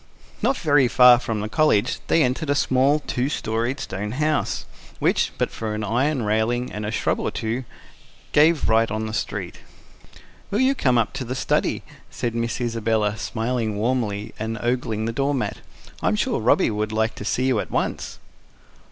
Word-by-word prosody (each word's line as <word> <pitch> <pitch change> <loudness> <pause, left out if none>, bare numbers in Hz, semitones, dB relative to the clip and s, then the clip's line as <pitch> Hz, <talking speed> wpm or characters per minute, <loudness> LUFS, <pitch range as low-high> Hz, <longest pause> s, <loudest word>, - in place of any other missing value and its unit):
Not 270 - +2
very 145 -5 +3
far 125 0 +7
from 115 -4 -3
the 105 - -3
College 120 -3 +2
they 165 - +4
entered 135 +4 -1
a 145 - +3
small, 140 +2 +2
two 130 -1 -2
storied 120 0 -2
stone 105 0 -4
house, 150 +2 0 0.3
which - - +1
but - - 0
for 110 -1 -4
an 110 - -3
iron 125 +5 0
railing 110 +4 0
and 105 0 -4
a - - -2
shrub - - 0
or - - -1
two 115 +3 -3 0.7
gave 155 +2 +4
right 115 +1 +3
on 110 +1 -2
the 110 - -5
street. - - -4 0.9
"Will 205 - 0
you 260 +1 +4
come 130 - +2
up 115 -2 +1
to - - -4
the 130 +1 -4
study?" - - 0 0.3
said 120 -2 -3
Miss 115 0 -2
Isabella, 115 -3 0
smiling 115 0 -2
warmly, 110 -3 -1
and 110 +1 -3
ogling 120 -3 -1
the 115 - -2
door 140 +3 0
mat. 125 - -2 0.4
"I'm - - +2
sure - - 0
Robby - - +3
would 105 0 -2
like 110 +1 0
to - - -8
see 125 +4 0
you 130 -4 +2
at - - -4
once." - - -2
120 Hz, 180 wpm, -23 LUFS, 110-130 Hz, 0.9 s, far